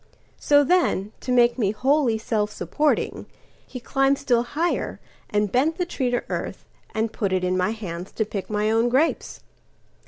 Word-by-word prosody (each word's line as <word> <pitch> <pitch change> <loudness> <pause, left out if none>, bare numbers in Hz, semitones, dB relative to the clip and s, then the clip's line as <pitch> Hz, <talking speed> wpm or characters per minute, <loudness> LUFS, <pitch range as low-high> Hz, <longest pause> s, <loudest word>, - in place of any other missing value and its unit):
So 290 0 +4
then, 280 - +1
to 255 - -4
make 240 0 +4
me 205 -4 +2
wholly 255 +2 +2
self 215 -1 -1
supporting, 295 +7 -1 0.4
He 255 - -7
climbed 270 +2 +1
still 250 -4 +2
higher 320 +8 -2 0.3
and 210 -1 0
bent 305 +6 +2
the 360 - 0
tree 265 -7 -2
to 245 0 0
earthAnd 220 0 -5
put 200 -3 -2
it 185 -1 0
in 180 0 +1
my 185 +2 +1
hands 190 -5 -6
to 220 - 0
pick 200 -2 -5
my 210 0 0
own 225 +2 +2
grapes. 275 +7 0
235 Hz, 165 wpm, -24 LUFS, 210-275 Hz, 0.4 s, So